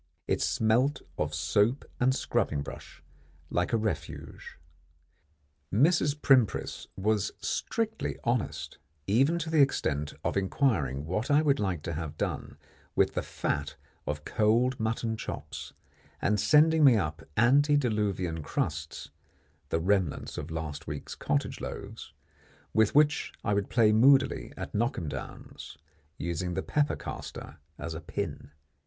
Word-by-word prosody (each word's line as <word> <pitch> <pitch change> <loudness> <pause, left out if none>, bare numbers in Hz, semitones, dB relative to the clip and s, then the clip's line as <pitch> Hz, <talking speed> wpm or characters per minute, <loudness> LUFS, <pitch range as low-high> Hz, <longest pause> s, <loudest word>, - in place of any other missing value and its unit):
It - - +1
smelt 125 +6 +2 0.2
of 75 0 -1
soap 105 - +1
and 130 +1 +3
scrubbing 75 - 0
brush 70 -1 -10 0.5
like 90 +1 0
a 115 - +3
Refuge. 110 -1 -5 1.1
Mrs. 145 - +3
Primpris 130 -7 +2
was 105 +1 +1
strictly 225 0 -2
honest, 120 -1 -2 0.3
even 135 - +3
to 165 -1 -3
the 155 -2 +5
extent 75 - +1
of - - -1
inquiring 95 - +1
what 100 +8 -2
I 145 +2 +5
would 140 -3 +3
like 90 -7 -1
to 85 - -3
have 80 -1 -5
done - - -3 0.4
with - - +3
the - - -1
fat - - -3 0.3
of 75 0 -3
cold 120 +4 +2
mutton 110 0 -1
chops, - - -6 0.5
and 105 +1 +1
sending 155 +8 +5
me 135 -4 +8
up 75 -6 -2 0.2
antediluvian 115 - +2
crusts, 75 +1 -3 0.6
the 80 - +1
remnants 95 -3 0
of - - -5
last 80 -2 -5
week's 75 -1 -5
cottage - - -2
loaves, - - -7 0.6
with 110 +2 +3
which 150 0 +3
I 105 - +1
would 100 -1 0
play 110 -3 +4
moodily 135 +5 +4
at - - -6
knock 120 +5 0
'em 80 -4 -3
downs, - - -8 0.4
using 85 +1 -2
the - - -1
pepper 145 -1 +1
caster - - -8 0.2
as 80 - -5
a 80 - -6
pin. 75 - -5
110 Hz, 135 wpm, -29 LUFS, 85-135 Hz, 1.1 s, me